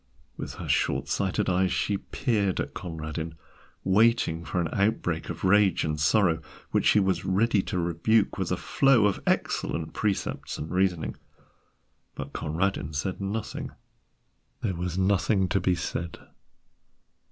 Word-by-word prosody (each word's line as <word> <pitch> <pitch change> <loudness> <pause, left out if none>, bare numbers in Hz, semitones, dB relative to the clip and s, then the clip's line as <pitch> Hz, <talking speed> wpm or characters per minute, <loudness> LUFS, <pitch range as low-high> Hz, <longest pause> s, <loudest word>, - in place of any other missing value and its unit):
With - - -6
her - - -7
short - - +1
sighted 95 -2 0
eyes 95 0 +2
she 100 -2 0
peered 100 -6 0
at - - -3
Conradin, 80 -1 -5 0.5
waiting 95 -5 +3
for 90 - -2
an 85 - +1
outbreak 100 -5 0
of 85 0 -6
rage 95 -2 +4
and 75 -1 -2
sorrow, 85 +1 +3 0.3
which - - +2
she - - +6
was 95 -1 +1
ready 100 +2 +2
to 90 - -4
rebuke 90 +6 +1
with 95 -2 -1
a 90 - +1
flow 135 -2 +3
of 100 - +1
excellent 80 -1 0
precepts 105 -3 -2
and 75 - -6
reasoning. 90 -3 0 1.0
But - - -7
Conradin 80 -1 -1
said 90 +7 -3
nothing: 100 +2 -4 0.9
there 95 - -1
was 90 0 -3
nothing 95 0 +2
to 100 - +2
be 90 0 +2
said. 85 -1 -4
95 Hz, 140 wpm, -27 LUFS, 85-100 Hz, 1.0 s, she